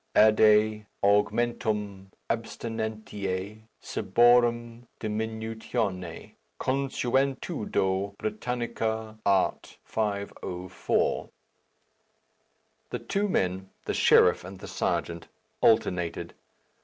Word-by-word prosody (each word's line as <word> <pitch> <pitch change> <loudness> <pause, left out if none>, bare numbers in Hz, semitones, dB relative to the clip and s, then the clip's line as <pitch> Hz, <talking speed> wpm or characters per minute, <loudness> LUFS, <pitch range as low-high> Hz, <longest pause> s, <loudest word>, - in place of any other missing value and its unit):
"Adde 110 0 +5 0.2
augmentum 105 -1 +1 0.2
abstinentiæ 110 -3 -4 0.2
ciborum 120 +2 +2
diminutione. 110 -4 -3 0.3
Consuetudo 130 -7 0
brittanica, 115 - -3
art. 100 -2 +1
504." 100 -4 -2 1.6
The - - -3
two 205 +1 -1
men, 95 - 0 0.2
the - - -1
sheriff 90 - +5
and 95 +2 -9
the - - -9
serjeant, 85 -1 -2 0.3
alternated. 90 -6 +2
110 Hz, 65 wpm, -28 LUFS, 95-120 Hz, 1.6 s, Adde